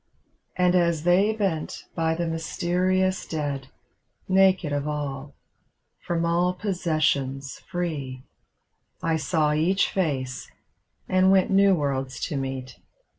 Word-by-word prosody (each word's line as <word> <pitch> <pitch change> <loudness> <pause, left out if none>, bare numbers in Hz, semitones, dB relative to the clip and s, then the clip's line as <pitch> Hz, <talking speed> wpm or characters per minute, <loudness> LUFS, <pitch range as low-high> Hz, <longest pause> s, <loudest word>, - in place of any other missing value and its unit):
And 180 -1 +3
as 170 -3 +2
they 185 +5 +4
bent 195 -8 -2
by 160 0 +1
the 170 +1 -2
mysterious 180 +3 0
dead. 145 -4 -3 0.6
Naked 190 -5 +3
of 145 0 -1
all, 145 -2 -4 0.7
from 170 -1 0
all 175 +2 +1
possessions 155 -8 -1
free, 145 -8 -4 0.8
I 165 -1 +1
saw 155 -1 +1
each 175 +6 +2
face 135 -8 -2 0.3
— - - -46
^and 185 0 +4
went 190 0 +4
new 195 0 +5
worlds 135 -4 -2
to 155 - -3
meet. 130 -2 -5
165 Hz, 120 wpm, -25 LUFS, 140-185 Hz, 0.8 s, new